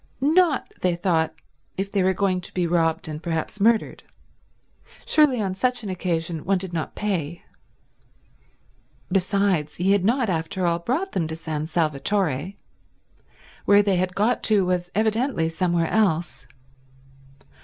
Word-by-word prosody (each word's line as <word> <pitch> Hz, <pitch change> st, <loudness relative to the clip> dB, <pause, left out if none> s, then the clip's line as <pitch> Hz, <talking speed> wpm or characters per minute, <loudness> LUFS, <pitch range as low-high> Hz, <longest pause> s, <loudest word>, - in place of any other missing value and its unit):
Not, 310 Hz, +2 st, +2 dB
they 180 Hz, -2 st, +1 dB
thought, 165 Hz, -3 st, 0 dB, 0.4 s
if 195 Hz, +1 st, -3 dB
they 200 Hz, -, +1 dB
were 185 Hz, 0 st, +2 dB
going 185 Hz, -1 st, 0 dB
to -, -, -7 dB
be 180 Hz, -1 st, +1 dB
robbed 165 Hz, -1 st, +1 dB
and 155 Hz, 0 st, -6 dB
perhaps 170 Hz, +4 st, -3 dB
murdered. 225 Hz, +1 st, +2 dB, 1.0 s
Surely 295 Hz, -6 st, +4 dB
on 195 Hz, -3 st, -1 dB
such 245 Hz, +4 st, -1 dB
an 200 Hz, -, -4 dB
occasion 170 Hz, -3 st, -2 dB
one 195 Hz, +1 st, +1 dB
did 180 Hz, -1 st, -6 dB
not 160 Hz, -2 st, -4 dB
pay. 175 Hz, -5 st, -3 dB, 1.7 s
Besides, 185 Hz, -5 st, +1 dB
he 185 Hz, +3 st, +1 dB
had 200 Hz, -2 st, +3 dB
not 235 Hz, +4 st, +2 dB
after 175 Hz, +1 st, -1 dB
all 170 Hz, 0 st, +1 dB
brought 285 Hz, -, -2 dB
them 165 Hz, -4 st, -1 dB
to 160 Hz, -, -5 dB
San 155 Hz, -2 st, -4 dB
Salvatore. 160 Hz, +1 st, 0 dB, 1.1 s
Where 205 Hz, 0 st, +6 dB
they 195 Hz, -2 st, +1 dB
had 180 Hz, 0 st, -1 dB
got 215 Hz, +4 st, +1 dB
to 205 Hz, -4 st, +3 dB
was 180 Hz, -1 st, -1 dB
evidently 220 Hz, -4 st, +1 dB
somewhere 170 Hz, 0 st, 0 dB
else. 175 Hz, -6 st, 0 dB
185 Hz, 145 wpm, -23 LUFS, 165-205 Hz, 1.7 s, Where